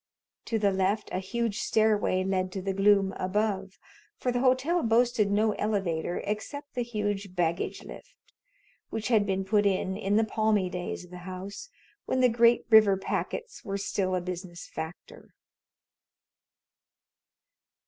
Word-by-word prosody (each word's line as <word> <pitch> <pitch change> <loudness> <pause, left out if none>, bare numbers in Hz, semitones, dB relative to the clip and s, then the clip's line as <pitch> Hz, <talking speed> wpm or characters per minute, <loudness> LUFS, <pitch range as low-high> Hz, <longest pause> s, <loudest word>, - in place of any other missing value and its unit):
To 225 - -1
the 205 -2 +2
left 195 +3 0
a - - 0
huge 220 +2 -2
stairway 215 -4 +2
led 185 -1 -1
to 190 - -3
the 195 0 -1
gloom 195 0 +3
above, 195 0 -1 0.4
for 250 - -1
the 245 - 0
hotel 260 +7 +2
boasted 230 -3 +2
no 215 +2 +2
elevator 190 -6 -1
except 285 +8 -5
the 250 - -2
huge 205 -5 -3
"baggage 170 -1 -1
lift," - - -12 0.7
which 220 +1 -3
had 215 -4 +3
been 190 0 -1
put 205 +1 +3
in 190 -1 0
in 200 0 0
the 220 - +4
palmy 215 -3 +1
days 180 0 -5
of 180 - -19
the 180 - -8
house, 195 - -7 0.4
when 260 - 0
the 250 -1 +5
great 235 +1 +4
river 215 -3 +7
packets 460 - -4
were 195 -1 -3
still 195 -1 -1
a 180 - -1
business 180 -1 -6
factor. 160 +2 -9
205 Hz, 150 wpm, -28 LUFS, 190-225 Hz, 0.7 s, river